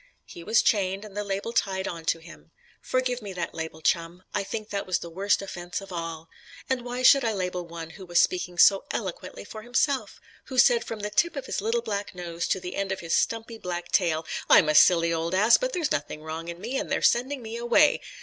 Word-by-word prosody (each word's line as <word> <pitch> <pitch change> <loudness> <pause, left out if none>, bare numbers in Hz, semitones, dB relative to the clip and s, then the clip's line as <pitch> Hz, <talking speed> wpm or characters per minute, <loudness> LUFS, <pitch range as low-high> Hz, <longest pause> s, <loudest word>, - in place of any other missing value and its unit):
He 170 - -11
was 220 +6 +3
chained, 195 -1 +1
and 205 -2 -12
the 210 - -2
label 200 +3 -3
tied 190 -4 0
on 165 -2 -6
to 165 - +2
him. 165 +1 -15 0.3
Forgive 255 -1 -1
me 200 -2 -7
that 175 -2 -4
label, 160 -1 -6
Chum; 170 +2 0
I - - 0
think 215 +2 -6
that 200 -1 -3
was 185 -2 +1
the 170 - -9
worst 195 +3 +1
offence 175 -2 -5
of 195 -1 -11
all. 165 -2 -5 0.4
And 260 -2 0
why 245 +1 -4
should 275 +1 +7
I 225 -2 +1
label 180 -3 -3
one 165 -1 -8
who 190 +1 -11
was 175 0 +3
speaking 180 -1 +1
so 195 +2 +6
eloquently 185 -3 -5
for 215 +1 -9
himself; 255 +4 0 0.3
who 260 - -7
said 240 -2 +5
from 225 -2 -6
the 210 0 -4
tip 340 +10 +2
of 275 - -5
his - - -3
little 230 +3 0
black 205 -4 -4
nose 170 -1 -4
to 190 - 0
the 180 0 -6
end 195 -1 -1
of 190 - -3
his 165 -1 -3
stumpy 225 0 -1
black 175 -2 -5
tail, 165 -4 +2 0.2
"I'm 155 - +7
a - - +3
silly 170 +1 +5
old 165 +2 -1
ass, 215 +5 +6
but - - -2
there's 340 -9 -1
nothing 150 +1 -3
wrong 160 +1 -6
in 170 0 -6
me, 240 +7 -3
and - - -5
they're - - 0
sending 255 +2 +2
me 225 +1 -6
away!" 240 +6 +4
195 Hz, 235 wpm, -26 LUFS, 170-230 Hz, 0.4 s, should